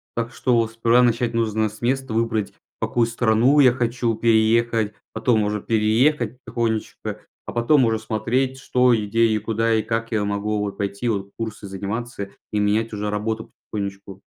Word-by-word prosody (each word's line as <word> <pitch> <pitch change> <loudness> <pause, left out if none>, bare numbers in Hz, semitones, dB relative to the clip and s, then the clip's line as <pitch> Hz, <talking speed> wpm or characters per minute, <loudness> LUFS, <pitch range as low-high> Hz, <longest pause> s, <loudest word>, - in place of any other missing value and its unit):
Так 115 +1 -3
что 125 -2 +1
вот 115 -1 +1
сперва 115 +2 +3
начать 120 0 +1
нужно 110 -1 0
с 105 +1 -15
места: 130 0 -1
выбрать, 110 -2 0
в - - -7
какую 120 -1 +1
страну 120 +4 +3
я 130 -3 +7
хочу 120 -1 -1
переехать, 110 -1 +2 0.2
потом 110 -1 +2
уже 105 0 -1
переехать 115 +3 +2
потихонечку. 115 -2 -2 0.5
А - - -6
потом 125 +3 +3
уже 110 -1 +1
смотреть: 125 +4 -1
что, 125 -1 +3
и 110 -2 0
где, 115 +3 +3
и 110 -1 +1
куда, 115 +1 0
и 110 - +1
как 115 +1 -2
я 105 -2 +1
могу 105 +1 -1
вот 100 -1 -3
пойти. 100 +3 -3
Вот 100 -2 -2
курсы 110 -3 -5
заниматься 100 +2 -5 0.2
и 105 - 0
менять 110 +2 +1
уже 105 0 -2
работу 110 +1 -3 0.2
потихонечку. 100 -1 -5
115 Hz, 175 wpm, -22 LUFS, 105-120 Hz, 0.5 s, я